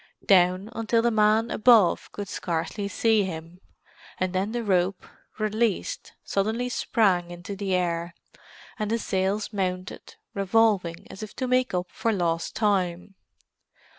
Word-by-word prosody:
Down, 185 +1 +4
until 230 0 +1
the 235 - +3
man 220 +1 +3
above 220 -5 +4
could 205 -1 -6
scarcely 180 +4 -3
see 220 +1 +2
him—and 180 +1 -8
then 190 +3 -1
the 240 0 -2
rope, 185 -2 0 0.3
released, 215 -1 -1
suddenly 220 +5 -1
sprang 190 -8 +1
into 175 +3 -7
the 195 -1 -1
air, 170 -1 -1 0.6
and 215 -1 -1
the 230 - +1
sails 200 0 -1
mounted, 185 -2 -4 0.2
revolving 195 -4 +1
as 190 - -10
if 215 -1 -8
to 260 - -2
make 255 -4 +1
up 180 0 0
for 230 - -1
lost 170 -4 -1
time. 190 -3 0
200 Hz, 135 wpm, -26 LUFS, 180-220 Hz, 0.6 s, Down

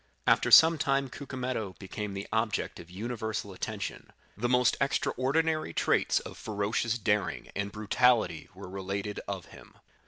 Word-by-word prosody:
After - - +4
some 160 0 +8
time 135 -2 +1
Cucumetto 125 -8 -4
became 100 +1 -5
the 100 +1 -5
object 110 -3 -1
of 85 - -11
universal 110 0 -4
attention; - - -5 0.2
the 120 +4 -1
most 125 -1 +4
extraordinary 145 - +1
traits - - +2
of - - -10
ferocious 110 +2 -1
daring 105 -2 -1
and 100 0 -2
brutality 110 -4 +2
were 95 0 -9
related 100 +2 -4
of 95 -4 -4
him. - - -15
110 Hz, 135 wpm, -29 LUFS, 100-125 Hz, 0.2 s, some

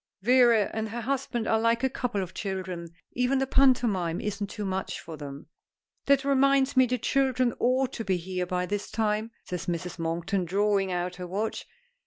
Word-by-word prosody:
Vera 240 -2 +5
and 220 0 -2
her 235 +3 -4
husband 250 -2 -2
are 220 - +3
like 230 +2 +2
a - - +5
couple 230 -7 -2
of 185 - -8
children. 185 -4 -4 0.2
Even 250 +2 +1
the 270 - +1
pantomime 235 -11 +3
isn't 205 -1 -3
too 210 -1 -5
much 190 0 -3
for 160 - -8
them." 140 -1 -8 0.6
"That 280 0 +4
reminds 275 0 +3
me 260 -1 +5
the 250 +1 0
children 255 -2 +1
ought 255 +1 +2
to 225 - -4
be 190 -3 +1
here 180 +1 -3
by 180 0 -1
this 205 +2 -3
time," 215 0 0
says 180 +1 -5
Mrs. 175 0 -3
Monkton, 170 +3 -1
drawing 195 +1 +1
out 180 0 -2
her 180 -1 -6
watch. 205 +5 -3
210 Hz, 185 wpm, -27 LUFS, 180-250 Hz, 0.6 s, Vera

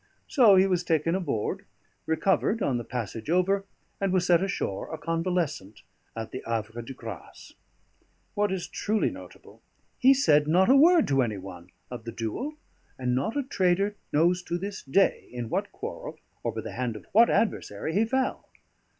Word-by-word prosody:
So 235 -9 +6
he 190 0 +6
was 180 -2 +1
taken 165 -1 +1
aboard, 175 - -2 0.4
recovered 195 +6 +1
on 125 -3 0
the - - -5
passage 115 +1 -5
over, 190 +3 +2 0.3
and 195 -1 0
was 185 -1 +2
set 175 -2 +4
ashore 180 - -3
a 160 - -4
convalescent 165 - -2 0.3
at 115 -1 -5
the 130 - -5
Havre 115 0 -3
de 115 - -9
Grace. 110 -8 -10 0.8
What 205 -1 +1
is 190 -2 -3
truly 215 +1 0
notable: - - -13 0.4
he 265 +2 +6
said 150 - +4
not 185 +8 +4
a - - +7
word 330 +3 +6
to 135 -1 +3
any 110 -5 -1
one 90 -2 -10 0.2
of 120 -2 -7
the 115 - -5
duel, 120 - -4 0.4
and 125 -1 -1
not 140 - -1
a 285 - +1
trader 195 -4 +1 0.2
knows 175 +4 +3
to 175 - -2
this 195 +2 -5
day 195 +9 +1
in 120 -2 -5
what - - -2
quarrel, - - -7 0.2
or - - -2
by - - -5
the - - -7
hand 125 -3 -3
of 105 - -10
what 230 +3 +6
adversary, 160 - -1
he 205 +5 +3
fell. 260 +3 -1
170 Hz, 175 wpm, -27 LUFS, 120-195 Hz, 0.8 s, a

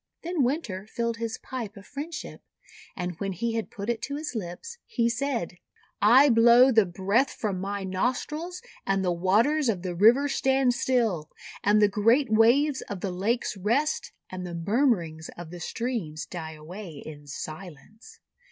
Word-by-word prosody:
Then 340 -2 -1
Winter 240 - -1
filled 235 0 -2
his 230 -1 -3
pipe 230 -5 -6
of 200 - -12
friendship, 305 +5 -7 0.5
and 180 -1 -4
when 195 -1 -2
he 230 +6 -2
had 225 -1 -2
put 200 0 -7
it 235 -2 -1
to 280 - -4
his 300 -1 -4
lips, 225 - -6
he 235 -2 +1
said: 235 -8 -2 0.2
— - - -37 0.2
"I 285 +2 +8
blow 235 +2 +7
the 220 -5 +4
breath 200 +9 +1
from 195 -4 -3
my 200 0 -3
nostrils 260 - -2 0.2
and 195 -1 0
the 180 - +2
waters 225 - +2
of 190 -5 -1
the 180 -2 -3
rivers 240 +10 +5
stand 265 -2 +2
still, 230 -11 0 0.3
and 205 +1 +4
the - - +7
great 225 +6 +2
waves 260 +6 +4
of 195 -3 -5
the 195 - -2
lakes 210 +6 -1
rest, 235 +11 0 0.2
and 185 -1 -5
the 175 -1 -5
murmurings 170 - 0
of 170 -2 -8
the 175 - -8
streams 185 -6 -3
die 160 -3 -7
away 160 0 -9
in 145 -2 -10
silence." 160 +7 -9
215 Hz, 170 wpm, -27 LUFS, 180-255 Hz, 0.5 s, I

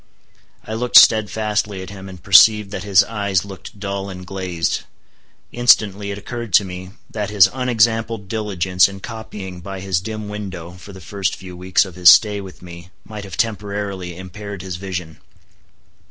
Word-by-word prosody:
I 110 - -6
looked 120 +2 +4
steadfastly 105 -2 +3
at 95 - -10
him, 95 -1 -10
and 90 -3 -12
perceived 105 +1 +6
that 95 - -5
his 100 -3 +5
eyes 100 -4 -1
looked 95 +1 -11
dull 100 -1 -4
and 90 -1 -9
glazed. 90 -3 -2 0.7
Instantly 105 -4 +3
it 100 - -5
occurred 115 0 -7
to 100 - +5
me, 90 0 -8 0.2
that 105 -2 -3
his 105 -3 +6
unexampled 115 -4 0
diligence 95 -4 +1
in 100 0 -10
copying 105 -4 -8
by 95 +1 -7
his 95 -2 -1
dim 110 +1 -6
window 95 -5 -7
for 90 +3 -13
the 95 -1 -12
first 100 +2 -3
few 90 -1 -11
weeks 95 +4 +1
of 95 - -10
his 90 -1 +6
stay 105 +4 +5
with 95 -2 -12
me 85 0 -11 0.2
might 105 -2 -8
have 95 -5 -9
temporarily 100 -5 -3
impaired 95 +1 -8
his 90 -2 -5
vision. 90 -4 -6
100 Hz, 170 wpm, -19 LUFS, 90-105 Hz, 0.7 s, perceived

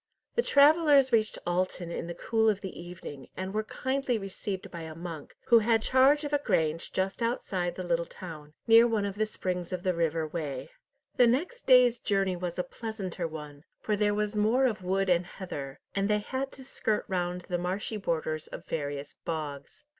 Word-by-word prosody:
The 475 - +3
travellers 290 - +5
reached 215 -1 +2
Alton 175 -1 -1
in 170 - -4
the 170 - -5
cool 225 -1 +2
of 205 -2 0
the 190 - -6
evening, 170 -6 -9
and 190 +1 -4
were 215 - +1
kindly 260 +2 -1
received 195 -1 -5
by 170 - -6
a 160 -1 -7
monk, 165 -3 -8
who 235 - +8
had 225 0 +2
charge 270 +4 +5
of 290 0 -4
a 290 - +4
grange 165 -5 0
just 190 +4 -1
outside 190 -7 -1
the 185 - -4
little 170 -1 0
town, 155 -4 -10
near 230 +1 +7
one 220 -3 0
of 200 - -2
the 215 +2 0
springs 180 -4 -3
of 180 -1 -3
the 185 -2 +2
River 165 -1 0
Wey. 155 - -5 0.5
The 245 -2 +7
next 340 - -1
day's 250 -2 +6
journey 195 -4 +1
was 175 -1 -4
a 180 - +1
pleasanter 195 -7 -5
one, 150 -2 -9 0.2
for 210 - 0
there 205 0 +2
was 210 0 -1
more 220 +6 +3
of 215 -7 0
wood 190 +2 0
and 180 -1 +3
heather, 145 -7 -7
and 200 +1 0
they 210 - +4
had 260 +6 -3
to 265 - -10
skirt 220 -4 -1
round 180 -1 -1
the 175 0 -3
marshy 190 +5 -2
borders 160 -5 -2
of - - -9
various 145 -2 -4
bogs. 150 -4 -5
190 Hz, 195 wpm, -29 LUFS, 170-225 Hz, 0.5 s, who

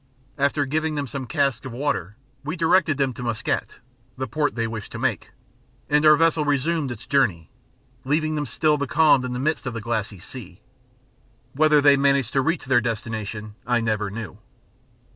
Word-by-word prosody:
After 140 +1 +1
giving 155 +3 -1
them 145 -1 -2
some 130 0 -6
casks 140 -5 0
of 130 - -7
water, 120 - -2 0.3
we 155 +4 -3
directed 165 -3 +3
them 135 -2 0
to 120 - -9
Muscat 120 -2 -2 0.4
(the 130 - -2
port 145 +5 -1
they 115 -1 -1
wished 110 -2 -6
to - - -5
make), - - -2 0.6
and 150 +1 +4
our 155 - +8
vessel 165 0 +2
resumed 145 +1 0
its 120 -1 -7
journey, 100 - +1 0.5
leaving 155 +3 0
them 150 -2 -2
still 150 +5 +1
becalmed 145 -1 +3
in 125 - -4
the - - -3
midst 150 +1 -1
of 125 - -4
that 115 - -4
glassy 110 -3 -3
sea. 95 -1 -10 0.9
Whether 150 +1 +4
they 140 -1 +6
managed 140 -3 +2
to 135 - +3
reach 165 +4 -1
their 130 -2 +3
destination 110 -2 -4
I 120 -1 +2
never 110 -2 -1
knew. 110 +1 -7
135 Hz, 180 wpm, -23 LUFS, 115-150 Hz, 0.9 s, our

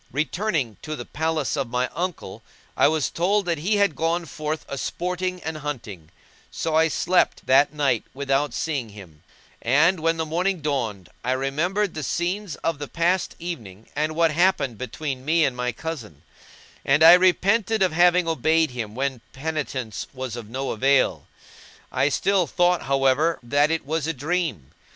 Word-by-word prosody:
Returning 150 - -1
to 155 0 -5
the - - -7
palace 160 -2 -1
of 135 -4 -2
my 125 +1 0
uncle, 165 - -4 0.3
I - - +5
was 155 -1 0
told 195 +4 +1
that 170 -3 -1
he 195 +8 +1
had 200 -6 +2
gone 165 +3 0
forth 155 0 -4
a - - -5
sporting 180 +5 -3
and 160 -1 -4
hunting; 110 - -6 0.4
so 160 - -3
I 160 +1 +4
slept 180 +3 +1
that 135 +2 +5
night 140 -6 +1
without 140 +1 0
seeing 140 -8 -2
him; 95 -7 -13 0.4
and, 160 +9 +3
when 165 +1 +1
the 160 - -1
morning 180 +4 0
dawned, 120 - -3
I 125 +1 +1
remembered 165 +10 -1
the 155 - -5
scenes 180 +4 -2
of 165 -3 -1
the 145 - -5
past 175 +4 0
evening 115 - -7
and 155 +1 -1
what 165 -1 +3
happened 165 - +1
between 130 +2 -4
me 160 +2 +3
and 130 - -1
my 125 0 -1
cousin; 115 - -7 0.6
I 160 +5 +7
repented 195 +4 +3
of 185 - +2
having 175 +1 +4
obeyed 160 -1 +2
him 115 -4 -5
when 135 -2 -2
penitence 135 - -4
was 130 -3 -5
of 115 -3 -8
no 135 +3 -3
avail, 135 +4 +2 0.6
I 140 - +2
still 185 +3 +1
thought, 180 -1 +2
however, 135 +4 +2
that 145 +5 +2
it 165 -2 -1
was 155 +1 -1
a 165 - 0
dream. 145 - -2
155 Hz, 165 wpm, -24 LUFS, 130-170 Hz, 0.6 s, I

